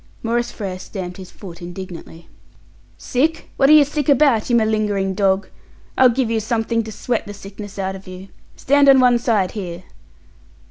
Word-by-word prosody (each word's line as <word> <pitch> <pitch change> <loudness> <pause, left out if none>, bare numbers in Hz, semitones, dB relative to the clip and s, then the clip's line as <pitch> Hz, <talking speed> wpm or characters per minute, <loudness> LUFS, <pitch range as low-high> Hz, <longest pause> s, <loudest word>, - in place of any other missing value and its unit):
Maurice 235 +1 -1
Frere 190 -4 -6
stamped 180 -2 -7
his 185 -2 -10
foot 180 -3 -11
indignantly. 175 -2 -9 0.7
"Sick! 300 +6 -1
What 270 0 +3
are - - +8
you 300 -2 +7
sick 295 0 -2
about, 275 -6 +3
you 240 - +3
malingering 215 -4 +1
dog? 195 -1 +1 0.5
I'll 260 -1 +6
give 245 -1 -1
you 225 - +1
something 230 +1 -1
to 220 - -7
sweat 225 +1 -3
the 205 - -7
sickness 200 +1 -10
out 190 0 -3
of 195 0 -12
you. 185 +1 -10 0.3
Stand 285 +1 +3
on 270 -1 +7
one 245 -2 +4
side 215 -6 +1
here!" 180 -4 -6
215 Hz, 175 wpm, -20 LUFS, 190-245 Hz, 0.7 s, are